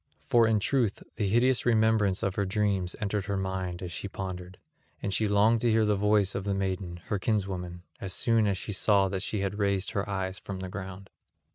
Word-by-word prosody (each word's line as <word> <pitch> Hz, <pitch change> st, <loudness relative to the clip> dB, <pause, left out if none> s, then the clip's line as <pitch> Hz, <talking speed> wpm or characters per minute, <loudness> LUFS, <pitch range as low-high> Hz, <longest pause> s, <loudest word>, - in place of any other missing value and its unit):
For 115 Hz, -1 st, +4 dB
in 110 Hz, -1 st, +3 dB
truth 115 Hz, -1 st, 0 dB
the 100 Hz, -2 st, 0 dB
hideous 125 Hz, +4 st, +3 dB
remembrance 110 Hz, -4 st, +3 dB
of 95 Hz, -, 0 dB
her 100 Hz, -, 0 dB
dreams 95 Hz, -2 st, 0 dB
entered 100 Hz, -1 st, -1 dB
her 100 Hz, -1 st, -2 dB
mind 95 Hz, -2 st, -3 dB
as 90 Hz, -, -5 dB
she 95 Hz, -, -5 dB
pondered; 95 Hz, -2 st, -6 dB, 0.4 s
and 100 Hz, -, -3 dB
she 110 Hz, -, +1 dB
longed 105 Hz, +3 st, +4 dB
to 120 Hz, -, +3 dB
hear 110 Hz, -1 st, +3 dB
the 105 Hz, 0 st, +2 dB
voice 105 Hz, -1 st, +3 dB
of 95 Hz, -, -3 dB
the 100 Hz, 0 st, -1 dB
maiden, 95 Hz, -2 st, -2 dB
her 105 Hz, -, 0 dB
kinswoman, 95 Hz, -4 st, -2 dB, 0.2 s
as 95 Hz, -, -5 dB
soon 115 Hz, +3 st, +2 dB
as 100 Hz, -2 st, 0 dB
she 105 Hz, -, -5 dB
saw 100 Hz, 0 st, +3 dB
that 95 Hz, -1 st, -3 dB
she 105 Hz, 0 st, -2 dB
had 100 Hz, +1 st, -2 dB
raised 100 Hz, -1 st, 0 dB
her 100 Hz, 0 st, -2 dB
eyes 95 Hz, -1 st, -3 dB
from 100 Hz, -1 st, -6 dB
the 95 Hz, -, -5 dB
ground. 95 Hz, 0 st, -8 dB
100 Hz, 215 wpm, -28 LUFS, 95-105 Hz, 0.4 s, For